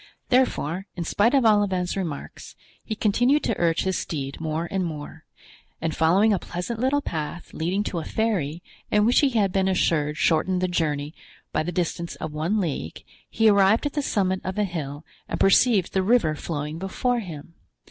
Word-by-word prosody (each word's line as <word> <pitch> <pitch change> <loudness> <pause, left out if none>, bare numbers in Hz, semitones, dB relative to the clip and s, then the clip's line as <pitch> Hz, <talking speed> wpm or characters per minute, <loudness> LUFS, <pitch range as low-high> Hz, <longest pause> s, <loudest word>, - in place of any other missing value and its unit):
Therefore, 195 - +1
in 175 - -3
spite 215 - +2
of 265 -4 +3
Olivain's 200 -4 +2
remarks, 170 -7 -6 0.3
he 220 - -4
continued 245 +8 +2
to - - -1
urge 170 -1 +2
his 190 -1 0
steed 140 -2 -5
more 160 +1 -2
and 190 -1 0
more, 155 -1 -7 0.5
and 160 -1 -2
following 190 +7 +4
a 195 - +1
pleasant 180 +8 -5
little 265 +4 +2
path, 160 +1 -5
leading 180 +6 -1
to 175 - -3
a - - -5
ferry, 175 -9 -1 0.3
and 210 0 +3
which 240 - +4
he 285 - +4
had 210 -6 +1
been 190 0 +1
assured 155 -5 +1
shortened 180 +4 +2
the 185 - +1
journey 150 -4 -1 0.4
by - - 0
the 165 +3 -3
distance 170 -1 -2
of 155 -1 -6
one 165 +8 0
league, 145 - -4 0.3
he 225 0 +2
arrived 200 +4 +4
at 290 - -1
the 295 - 0
summit 190 -7 0
of 190 +1 -4
a 210 - +2
hill 155 -5 -5 0.2
and - - -3
perceived 195 -1 +4
the 190 - +2
river 190 -6 +3
flowing 150 0 -4
before 240 +6 -1
him. 170 -6 -8
185 Hz, 185 wpm, -24 LUFS, 160-210 Hz, 0.5 s, following